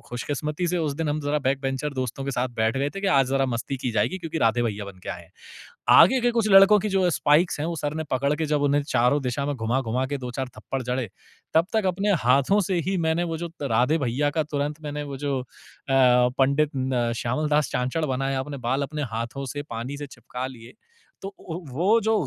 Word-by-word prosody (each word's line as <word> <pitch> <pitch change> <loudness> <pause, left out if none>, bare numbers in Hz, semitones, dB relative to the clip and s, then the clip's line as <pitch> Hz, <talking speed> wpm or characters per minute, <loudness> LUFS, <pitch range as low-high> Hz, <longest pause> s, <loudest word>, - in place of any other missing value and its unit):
खुशकिस्मती 150 +6 -3
से 180 0 0
उस 150 -3 -1
दिन 160 +1 -2
हम 150 +1 -1
ज़रा 145 +1 0
बैकबेंचर 135 +1 -1
दोस्तों 130 +1 -3
के 140 - -2
साथ 125 -1 -1
बैठ 110 +3 +1
गए 140 +2 0
थे 195 - -7
कि, 200 - -1
"आज 135 -8 +4
ज़रा 135 0 +1
मस्ती 125 +3 -3
की 125 -1 -3
जाएगी, 110 - 0
क्योंकि 165 -1 -4
राधे 115 +1 +2
भैया 105 -3 -2
बन 95 -2 -11
के - - -9
आए 85 - -5
हैं।" 85 - -20 0.7
आगे 260 +9 +7
के 240 0 +2
कुछ 225 -2 +1
लड़कों 195 +2 +8
की 210 - -2
जो 190 -2 +2
स्पाइक्स 150 +1 +2
हैं, 155 - -1
वो 170 - -2
सर 145 0 -1
ने 160 - -2
पकड़ 140 +3 +1
के 160 0 -1
जब 150 -1 0
उन्हें 145 0 +3
चारों 140 0 +2
दिशा 130 +3 -2
में 145 - -2
घुमा-घुमा 125 +1 -1
के - - 0
2-4 125 +1 -4
थप्पड़ 130 +5 -4
जड़े, 125 -3 -2 0.4
तब 165 +3 +4
तक 220 -3 +1
अपने 195 +3 +1
हाथों 135 +11 +4
से 180 -3 +1
ही 190 - 0
मैंने 165 +2 +1
वो, 165 -2 -3
जो 170 - -4
त - - -3
राधे 125 +8 +3
भैया 140 +5 +1
का 155 - +3
तुरंत 150 +1 -3
मैंने 150 0 -4
वो - - -5
जो 140 -2 0
अ, 125 - -12 0.9
पंडित 140 +3 +3
न 130 -3 0
श्यामलदास 150 +4 0
चांचड़ 130 +6 -1
बनाया। 135 0 -1
अपने 140 +1 -5
बाल 135 +2 +1
अपने 150 +1 -4
हाथों 120 +4 -4
से 145 0 -4
पानी 120 +5 -5
से 145 0 -6
चिपका 125 0 -6
लिए। 120 -3 -12 0.5
तो - - -3
उ 185 -4 -10
हु 170 0 -7
वो 210 +7 +4
जो 220 +2 +1
140 Hz, 230 wpm, -25 LUFS, 125-160 Hz, 0.9 s, लड़कों